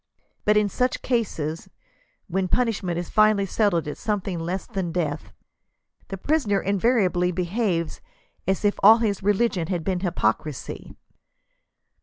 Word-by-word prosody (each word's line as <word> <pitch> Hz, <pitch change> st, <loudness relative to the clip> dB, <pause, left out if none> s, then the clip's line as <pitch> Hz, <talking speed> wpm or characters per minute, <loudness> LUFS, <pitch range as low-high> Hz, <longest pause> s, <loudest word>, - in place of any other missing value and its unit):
But 210 Hz, 0 st, +4 dB
in 210 Hz, -1 st, +3 dB
such 250 Hz, +5 st, -1 dB
cases, 165 Hz, -, -2 dB, 0.6 s
when 190 Hz, +1 st, -1 dB
punishment 200 Hz, -6 st, 0 dB
is 175 Hz, -1 st, -3 dB
finally 215 Hz, -2 st, +4 dB
settled 190 Hz, -5 st, +1 dB
at 150 Hz, -, -6 dB
something 200 Hz, -5 st, -2 dB
less 175 Hz, +3 st, -3 dB
than 190 Hz, -7 st, -3 dB
death, 160 Hz, -4 st, -3 dB, 0.8 s
the 195 Hz, -, -6 dB
prisoner 215 Hz, -4 st, +1 dB
invariably 195 Hz, -3 st, +1 dB
behaves 180 Hz, -1 st, -1 dB, 0.5 s
as 190 Hz, +2 st, 0 dB
if 205 Hz, -, +1 dB
all 220 Hz, +3 st, +8 dB
his 215 Hz, -4 st, -1 dB
religion 200 Hz, -3 st, +1 dB
had 175 Hz, -3 st, -2 dB
been 185 Hz, 0 st, -1 dB
hypocrisy." 150 Hz, -, -2 dB
190 Hz, 130 wpm, -24 LUFS, 175-215 Hz, 0.8 s, all